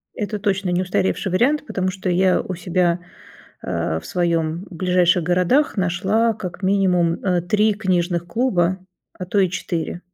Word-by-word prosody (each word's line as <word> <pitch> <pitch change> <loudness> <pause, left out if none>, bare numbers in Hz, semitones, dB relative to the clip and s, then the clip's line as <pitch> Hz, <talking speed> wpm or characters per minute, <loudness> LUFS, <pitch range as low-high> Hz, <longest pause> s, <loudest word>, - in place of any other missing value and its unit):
Это 210 -1 -3
точно 195 -2 -1
не 180 +1 +1
устаревший 140 - -1
вариант, 280 +10 +2
потому 185 -7 -2
что 190 0 -4
я 185 +1 +3
у 185 - -5
себя, 175 0 0 0.6
а, 80 0 -2
в - - -12
своём 170 0 -1
ближайших 180 0 +2
городах 180 - +2
нашла 195 +6 +1
как 190 -2 -7
минимум, 185 -3 +2
э, 180 -3 +1
3 210 +3 +2
книжных 175 -4 0
клуба, 185 -3 +1 0.4
а 180 - -4
то 200 - -1
и 185 -2 +3
4. 170 -1 -4
185 Hz, 155 wpm, -21 LUFS, 175-195 Hz, 0.6 s, я